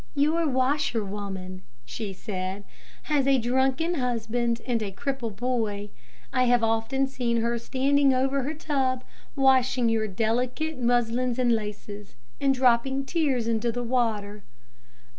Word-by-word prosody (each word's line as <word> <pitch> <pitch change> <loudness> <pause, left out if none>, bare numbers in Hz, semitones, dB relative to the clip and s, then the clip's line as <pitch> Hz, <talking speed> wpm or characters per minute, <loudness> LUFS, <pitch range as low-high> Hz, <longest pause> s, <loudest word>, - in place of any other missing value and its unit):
"Your 310 +3 +2
washerwoman," 205 -8 -2 0.2
she 195 - -5
said, 190 0 -5 0.4
"has 285 -3 +1
a 275 -1 +5
drunken 265 +7 +1
husband 235 -3 -1
and 240 -3 0
a 205 -2 -3
cripple 265 +3 -3
boy. 210 -2 -2 0.4
I 255 - +3
have 245 -1 +3
often 225 +4 +1
seen 240 -4 -1
her 235 +1 0
standing 275 +3 +2
over 265 +2 +1
her 290 +5 -3
tub, 265 -5 -1 0.3
washing 260 -3 +3
your 220 -1 +1
delicate 250 +9 -1
muslins 240 0 +1
and 250 -2 +2
laces, 210 - -4 0.2
and 275 - +3
dropping 265 +1 +2
tears 270 -7 0
into 230 +1 +1
the 245 +1 -3
water." 220 -4 -1
245 Hz, 130 wpm, -26 LUFS, 225-265 Hz, 0.4 s, a